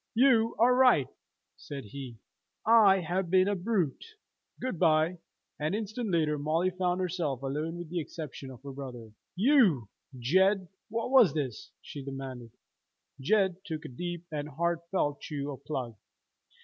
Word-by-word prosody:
"You 230 -2 +4
are 245 +2 +5
right!" 250 - +5 0.5
said 140 -2 -7
he. 125 +1 -8 0.5
"I 210 -4 +6
have 175 +2 -2
been 185 +1 +4
a 205 - +1
brute! 185 - -1 0.6
Good 255 -10 -3
by!" 160 +1 +3 0.4
An 155 +6 0
instant 220 +1 -3
later 155 -4 +1
Molly 165 +5 +1
found 180 0 -1
herself 165 -8 -2
alone 150 +5 -3
with 175 -2 -7
the 175 - -1
exception 150 -4 -7
of 130 0 -12
her 140 - -7
brother. 125 -5 -8 0.2
"You, 195 - +4 0.3
Jed, 190 - +3 0.2
what 230 +3 -2
was 250 -11 +6
this?" 135 -7 -3
she 145 - -8
demanded. 135 -3 -7 0.7
Jed 190 +5 +2
took 155 -2 -6
a - - -6
deep 175 +6 -5
and 150 -1 -4
heartfelt 170 0 -1
chew 145 -1 -4
of 135 0 -10
plug. 125 -6 -4
165 Hz, 150 wpm, -29 LUFS, 140-190 Hz, 0.7 s, I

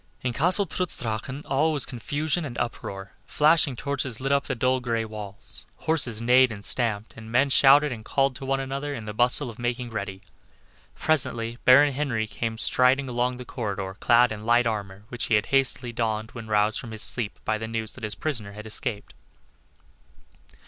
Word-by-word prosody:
In 125 -1 -1
Castle 180 - +2
Trutz 180 -2 -2
Drachen 120 +5 -4
all 150 +4 +2
was 145 -4 0
confusion 145 +7 -2
and 125 -5 -6
uproar: 95 -4 -5 0.2
flashing 150 -3 +3
torches 130 -3 -3
lit 135 +1 -2
up 140 0 +2
the - - -2
dull 130 +2 +1
gray 115 -2 -1
walls; 105 -2 -6
horses 120 -8 -1
neighed 125 +1 +5
and 100 -2 -8
stamped, 110 -3 +1
and 115 0 -10
men 135 +3 +3
shouted 145 +2 +6
and 110 -3 -6
called 135 +2 +1
to - - -10
one 135 0 0
another 140 +2 -4
in 115 - -7
the 105 - -5
bustle 125 +5 +2
of 115 -1 -9
making 120 0 -3
ready. 100 -2 -5 0.7
Presently 120 -6 0
Baron 140 +3 +7
Henry 130 -6 -1
came 110 +1 -4
striding 130 +4 +3
along 125 0 -1
the 125 - -8
corridor 100 -6 -4
clad 120 0 +4
in 105 -1 -6
light 120 +2 +3
armor, 100 -3 -3
which 120 -1 -3
he 115 - +2
had 105 - +2
hastily 130 -2 +1
donned 110 -1 -2
when 115 -2 -9
roused 105 0 +2
from 120 - -8
his 110 -1 -4
sleep 115 -5 0
by 110 0 0
the 110 - -4
news 110 -1 -4
that 130 - -13
his 105 -1 -1
prisoner 115 -11 -2
had 105 +1 -9
escaped. 110 0 -3
120 Hz, 190 wpm, -25 LUFS, 110-135 Hz, 0.7 s, Baron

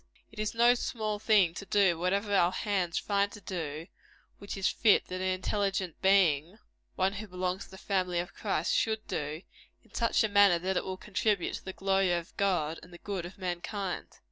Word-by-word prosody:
It 220 - -12
is 215 +1 -2
no 240 +1 +6
small 215 -3 -3
thing 205 -6 +4
to 190 - -7
do 195 -4 +3
whatever 200 +5 -1
our 180 -2 +4
hands 190 -5 -1
find 200 0 +1
to - - -9
do, 160 -5 -5 0.5
which 200 0 -6
it - - -6
is - - +3
fit 215 -3 +4
that 185 0 -4
an 185 - 0
intelligent 190 -1 -1
being 185 -2 +3 0.4
one 190 +1 +1
who 210 +2 -6
belongs 185 0 -3
to - - -19
the 190 - -12
family 185 -3 -1
of 175 +1 -3
Christ - - -1
should 220 -1 0
do, 150 +3 -4 0.4
in - - -26
such 230 -1 +2
a - - +2
manner 200 -3 +5
that 185 +3 -2
it - - 0
will 185 0 -4
contribute 200 -1 0
to - - -16
the 190 - -4
glory 195 -1 +1
of 170 -1 -4
God, 175 -5 0
and 170 - -15
the 175 - -11
good 185 -2 -4
of 180 - -14
mankind. 185 +1 -4
190 Hz, 205 wpm, -30 LUFS, 175-205 Hz, 0.5 s, no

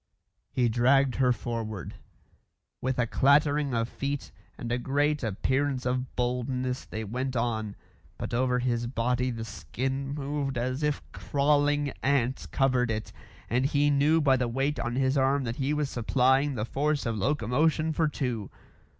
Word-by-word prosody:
He 125 -1 +2
dragged 130 +3 +3
her 125 -1 +4
forward. 115 -5 -4 0.9
With 130 0 -1
a 120 - +2
clattering 140 +2 +3
of 115 0 0
feet 140 +2 -4 0.3
and 120 - -5
a 120 - +1
great 145 +4 +1
appearance 130 +4 0
of 125 0 -2
boldness 125 +1 -1
they 110 - -5
went 125 +5 -3
on, 110 -3 -1 0.4
but - - -5
over 125 +1 +2
his 120 -1 0
body 125 +1 0
the 115 -2 -4
skin 130 +5 -3
moved 140 -2 -2
as 130 +4 -1
if 150 -1 0
crawling 145 0 +1
ants 135 -2 +1
covered 130 -3 +1
it, 110 -1 -3 0.3
and 125 +2 +1
he 145 0 +2
knew 145 +3 +4
by 135 -4 +4
the 125 -1 0
weight 135 +5 -1
on 120 0 -2
his 135 +1 +2
arm 135 +1 +2
that 115 -1 -4
he 135 +1 0
was 150 -1 0
supplying 130 +3 +2
the 105 -2 -2
force 145 +4 0
of 115 -1 -1
locomotion 145 +7 +1
for 160 0 +2
two. 125 -8 -3
130 Hz, 160 wpm, -28 LUFS, 120-140 Hz, 0.9 s, her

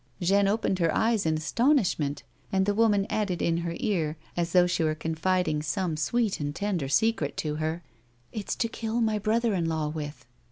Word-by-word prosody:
Jeanne 195 +2 +3
opened 200 -2 0
her 165 -2 +2
eyes 220 -5 +2
in 155 0 +2
astonishment, 170 - +1 0.3
and 190 0 +2
the 205 - +1
woman 205 -2 +3
added 200 -5 -1
in 165 0 +1
her 170 0 -3
ear, 160 -7 -1 0.2
as 170 -1 -1
though 180 0 +5
she 170 -2 0
were 155 -1 +1
confiding 160 0 0
some 160 +3 -1
sweet 205 +8 0
and 145 0 -3
tender 195 -8 -1
secret 155 0 +1
to 150 -1 -2
her: 160 +2 -2 0.2
" 120 0 -37
It's 210 -3 -3
to 230 - 0
kill 225 0 -3
my 220 -2 +1
brother 225 +2 +1
in 175 -3 0
law 155 -2 -1
with." 150 -1 -6
175 Hz, 195 wpm, -27 LUFS, 155-210 Hz, 0.3 s, though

